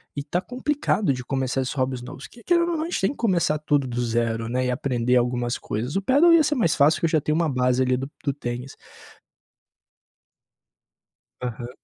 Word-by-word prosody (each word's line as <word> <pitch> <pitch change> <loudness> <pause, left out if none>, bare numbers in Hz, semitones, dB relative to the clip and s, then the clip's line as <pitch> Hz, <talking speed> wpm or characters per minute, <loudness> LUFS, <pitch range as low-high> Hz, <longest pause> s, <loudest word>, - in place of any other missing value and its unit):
e 140 - -3
tá 175 +4 -2
complicado 250 - 0
de 125 -1 -6
começar 135 0 -1
esses 130 - -3
hobbies 130 -2 -1
novos. 130 +2 -9
Que 235 - -17
querendo 345 0 +2
ou 330 - -1
não, 310 - -2
a - - -2
gente - - -1
tem 195 - +1
que 285 - -9
começar 175 -9 +1
tudo 145 -2 +1
do 120 0 -3
zero, 115 -1 -1
né, 130 +1 0
e 125 - 0
aprender 125 -1 0
algumas 120 0 0
coisas. 120 - -4
O 195 - +1
Padel 290 - +5
ia 330 -2 +6
ser 295 +1 0
mais 220 - +2
fácil, 150 +2 +4
que - - 0
eu 165 - +2
já 155 -2 +2
tenho 150 - 0
uma 165 0 +1
base 125 -2 +1
ali, 130 0 +2
do 135 +2 -4
do 140 - 0
tênis. 125 -1 -6 2.7
Aham. 120 -1 -5
135 Hz, 215 wpm, -24 LUFS, 125-185 Hz, 2.7 s, ia